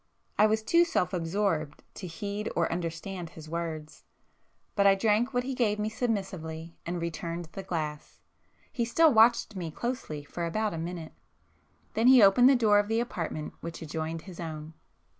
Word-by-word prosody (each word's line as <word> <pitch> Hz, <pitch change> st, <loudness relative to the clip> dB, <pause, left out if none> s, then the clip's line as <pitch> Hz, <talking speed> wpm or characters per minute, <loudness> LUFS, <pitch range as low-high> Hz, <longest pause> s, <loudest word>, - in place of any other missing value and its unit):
I 215 Hz, -, +7 dB
was 220 Hz, 0 st, +1 dB
too 335 Hz, +9 st, +5 dB
self 185 Hz, -, 0 dB
absorbed 165 Hz, -3 st, -1 dB
to 185 Hz, -, -7 dB
heed 205 Hz, +4 st, -4 dB
or 170 Hz, -, +1 dB
understand 170 Hz, +1 st, -4 dB
his 155 Hz, 0 st, -11 dB
words, 160 Hz, -2 st, -5 dB, 0.7 s
but 200 Hz, -1 st, +4 dB
I 195 Hz, -, +6 dB
drank 220 Hz, +5 st, +2 dB
what 245 Hz, -1 st, 0 dB
he 265 Hz, +1 st, -3 dB
gave 225 Hz, -5 st, +1 dB
me 210 Hz, +1 st, -1 dB
submissively 185 Hz, -8 st, -3 dB
and 175 Hz, 0 st, -2 dB
returned 170 Hz, 0 st, -4 dB
the 195 Hz, -, -6 dB
glass,—he 155 Hz, -, -6 dB
still 305 Hz, +6 st, +4 dB
watched 230 Hz, 0 st, +5 dB
me 175 Hz, -3 st, -4 dB
closely 160 Hz, -, -4 dB
for 170 Hz, +4 st, -4 dB
about 215 Hz, +4 st, -1 dB
a 165 Hz, -, -4 dB
minute. 165 Hz, -1 st, -5 dB, 0.8 s
Then 225 Hz, +2 st, +2 dB
he 255 Hz, -3 st, +8 dB
opened 245 Hz, +6 st, +7 dB
the 275 Hz, -, +6 dB
door 215 Hz, -4 st, +5 dB
of 205 Hz, -, 0 dB
the 225 Hz, +1 st, +1 dB
apartment 170 Hz, -9 st, -4 dB
which 165 Hz, 0 st, -6 dB
adjoined 160 Hz, +1 st, -4 dB
his 185 Hz, -3 st, -11 dB
own. 160 Hz, -2 st, -6 dB
185 Hz, 170 wpm, -29 LUFS, 165-220 Hz, 0.8 s, he